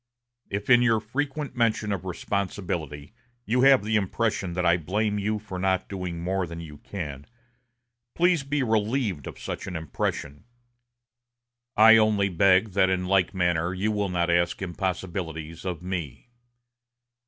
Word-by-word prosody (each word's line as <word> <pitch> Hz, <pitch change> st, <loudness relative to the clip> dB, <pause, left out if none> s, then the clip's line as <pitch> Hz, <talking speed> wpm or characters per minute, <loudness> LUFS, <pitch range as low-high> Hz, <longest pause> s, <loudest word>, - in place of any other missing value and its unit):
If, 100 Hz, +1 st, -4 dB
in 120 Hz, -1 st, +6 dB
your 115 Hz, -2 st, +3 dB
frequent 135 Hz, +5 st, -3 dB
mention 115 Hz, -3 st, +1 dB
of 95 Hz, -2 st, -3 dB
responsibility, 90 Hz, -6 st, -4 dB, 0.3 s
you 125 Hz, +4 st, +1 dB
have 135 Hz, -3 st, +6 dB
the 110 Hz, +1 st, +1 dB
impression 100 Hz, -2 st, -1 dB
that 90 Hz, 0 st, -1 dB
I 85 Hz, 0 st, +5 dB
blame 105 Hz, +5 st, -1 dB
you 105 Hz, +2 st, -1 dB
for 100 Hz, -3 st, -7 dB
not 95 Hz, 0 st, 0 dB
doing 90 Hz, -3 st, -5 dB
more 95 Hz, 0 st, -1 dB
than 85 Hz, 0 st, -7 dB
you 75 Hz, -3 st, -10 dB
can, 75 Hz, -8 st, -7 dB, 0.9 s
please 175 Hz, -2 st, +3 dB
be 140 Hz, 0 st, -1 dB
relieved 110 Hz, -, 0 dB
of -, -, -8 dB
such -, -, -5 dB
impression. 80 Hz, -2 st, -4 dB, 1.3 s
I 110 Hz, +1 st, +9 dB
only 105 Hz, -2 st, +3 dB
beg 95 Hz, +3 st, +4 dB
that 95 Hz, 0 st, +3 dB
in 90 Hz, -1 st, 0 dB
like 95 Hz, +1 st, +2 dB
manner 90 Hz, 0 st, +1 dB
you 105 Hz, +4 st, 0 dB
will 105 Hz, -2 st, -1 dB
not 85 Hz, -1 st, 0 dB
ask 85 Hz, 0 st, +1 dB
impossibilities 85 Hz, -3 st, -4 dB
of 90 Hz, -2 st, -4 dB
me. 90 Hz, -, -5 dB
95 Hz, 145 wpm, -26 LUFS, 85-110 Hz, 1.3 s, I